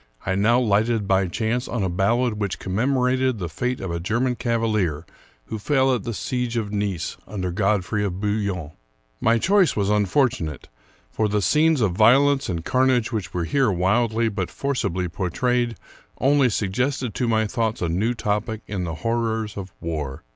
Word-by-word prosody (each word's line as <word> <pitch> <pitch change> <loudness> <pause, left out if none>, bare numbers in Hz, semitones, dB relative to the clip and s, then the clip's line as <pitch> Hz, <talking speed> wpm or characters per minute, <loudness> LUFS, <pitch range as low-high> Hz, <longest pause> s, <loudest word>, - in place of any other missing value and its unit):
I 95 - 0
now 110 +5 +3
lighted 110 -1 +1
by 95 -1 +2
chance 115 +7 -1
on 115 -5 -2
a - - +1
ballad 105 +5 +1
which 100 -2 -1
commemorated 125 +4 +1
the 90 -4 -3
fate 125 +11 -2
of 95 - -4
a 85 - -2
German 115 +8 0
cavalier 110 -10 0 0.4
who 110 - -5
fell 135 +3 +2
at 120 -4 -2
the 115 - -3
siege 125 0 -2
of 105 -3 -2
Nice 100 -5 -2
under 90 -4 -3
God 100 0 +1
frey 105 +3 -1
of 95 -2 -3
Bouillon. 100 -6 -2 0.5
My 115 +1 +3
choice 190 - +3
was 100 -1 +1
unfortunate; 105 - 0 0.4
for 110 - 0
the 105 +1 +1
scenes 150 - +3
of 105 -4 +2
violence 135 +8 +4
and 85 -3 -3
carnage 130 -3 +2
which 105 -6 -3
were 90 - -2
here 130 - +2
wildly 110 +5 +1
but 100 -4 -2
for 140 0 -2
cibly 90 -7 -1
portrayed 120 +7 -1 0.4
only 140 -1 +4
suggested 120 +4 -1
to 120 +5 -1
my 110 -1 +2
thoughts 115 0 -1
a 85 - -1
new 105 +9 0
topic 105 +1 -2
in 95 -4 -3
the 80 -1 -4
horrors 115 -2 -1
of 95 -2 -7
war. 75 -5 -4
110 Hz, 175 wpm, -23 LUFS, 95-125 Hz, 0.5 s, violence